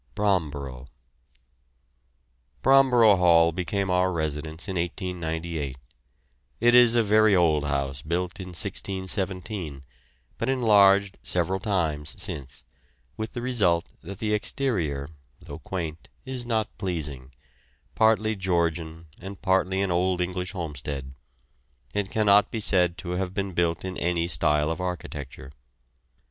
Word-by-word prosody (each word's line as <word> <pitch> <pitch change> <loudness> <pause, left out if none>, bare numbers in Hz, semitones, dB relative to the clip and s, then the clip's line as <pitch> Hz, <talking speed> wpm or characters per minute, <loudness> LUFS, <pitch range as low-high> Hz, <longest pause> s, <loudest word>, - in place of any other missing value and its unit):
BROMBOROUGH. 70 -10 -1 1.8
Bromborough 125 -6 +6
Hall 85 -2 +5
became 95 +2 -2
our 90 +1 +2
residence 80 -1 -4
in 95 - -4
1898. 85 -5 -3 0.8
It 120 +1 +4
is 120 -1 +7
a 120 - +4
very 110 0 +4
old 80 -4 +3
house 70 -2 -2
built 85 +5 -3
in 95 - -6
1617, 95 -2 -3 0.6
but - - -1
enlarged 100 -6 +4
several 90 +2 -1
times 80 -8 -2
since, 65 -3 -5 0.5
with 110 0 -5
the 120 - -5
result 95 -10 +1
that 100 +2 -8
the 105 +1 -1
exterior, 95 - -1 0.3
though - - -10
quaint, 85 -4 -6 0.2
is 130 -2 -5
not 110 -2 -1
pleasing 75 -9 -4 0.6
partly 110 0 +3
Georgian 85 -3 -1
and 95 0 -9
partly 95 0 +2
an 95 - -1
old 90 +1 +1
English 90 +1 -2
homestead; 70 -6 -5 0.8
it 100 -2 -1
cannot 105 -1 +4
be 115 - -4
said 90 -4 +3
to 90 -1 -6
have 90 +1 -3
been 100 -2 -2
built 85 0 0
in 95 0 -5
any 85 -1 0
style 75 -2 +2
of 85 +3 -4
architecture. 70 -7 -6
90 Hz, 125 wpm, -26 LUFS, 80-100 Hz, 1.8 s, is